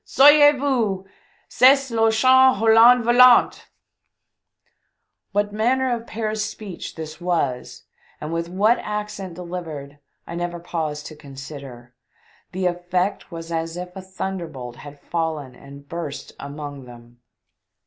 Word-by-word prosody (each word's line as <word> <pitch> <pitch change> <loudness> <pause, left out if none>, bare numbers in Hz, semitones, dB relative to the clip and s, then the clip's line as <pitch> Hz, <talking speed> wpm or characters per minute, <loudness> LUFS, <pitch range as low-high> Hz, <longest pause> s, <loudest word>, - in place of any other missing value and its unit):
Sauvez 290 +2 +6
voMS! 230 -9 0 0.4
Cest 270 0 +4
r 225 -1 +2
Hollandais 240 -1 +5
Volant 245 +1 +5 0.8
/" - - -50
What 205 +1 -1
manner 250 +4 +1
of 230 0 -9
Paris 215 -1 -3
speech 210 -3 -7
this 155 +1 -8
was, 165 -8 -2 0.4
and 150 +2 -5
with 170 0 -3
what 210 +6 +2
accent 210 -4 -5
delivered, 165 -5 -7 0.3
I - - -8
never 175 0 -4
paused 155 -3 -4
to 155 - -9
consider; 135 -4 -11 0.6
the 185 0 -3
effect 180 +2 -2
was 165 0 -8
as 165 +1 -3
if 180 +1 -7
a 190 - -7
thunder 190 -1 -5
bolt 125 -5 -9
had 145 -1 -12
fallen 160 -6 -4
and 140 +2 -14
burst 160 -3 -7
amone 145 -1 -8
them. 120 0 -15
175 Hz, 130 wpm, -22 LUFS, 150-220 Hz, 0.8 s, Sauvez